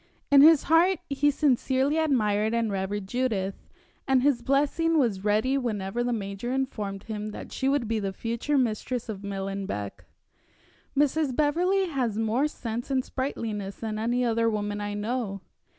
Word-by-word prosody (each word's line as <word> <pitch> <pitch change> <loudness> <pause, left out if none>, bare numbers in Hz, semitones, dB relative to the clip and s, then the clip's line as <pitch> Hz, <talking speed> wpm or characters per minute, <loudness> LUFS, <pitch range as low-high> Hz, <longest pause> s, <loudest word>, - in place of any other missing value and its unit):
In 280 -1 +8
his 315 0 +7
heart 340 +4 +4
he 280 +1 +3
sincerely 275 +1 +1
admired 220 -7 +1
and 230 -2 0
revered 195 +1 -2
Judith, 200 -4 -2 0.4
and 265 -2 +3
his 275 -4 +3
blessing 295 +6 +1
was 220 -9 +1
ready 220 +6 +2
whenever 215 -2 -2
the 245 - -1
major 205 +1 -3
informed 215 -7 -3
him 215 -1 -5
that - - -8
she 265 - 0
would 275 -5 +1
be 225 0 0
the 195 -2 -2
future 235 +8 -2
mistress 245 0 -1
of 200 -3 -5
Millenbeck. 195 - -4 0.9
"Mrs. 290 -1 +2
Beverley 355 +7 +2
has 250 -8 -1
more 225 +6 +1
sense 235 -4 -5
and 260 -2 0
sprightliness 215 -7 -4
than 215 -1 -4
any 240 +3 +1
other 230 0 +2
woman 205 -1 -2
I 205 0 -3
know. 210 -2 -3
235 Hz, 155 wpm, -27 LUFS, 205-275 Hz, 0.9 s, In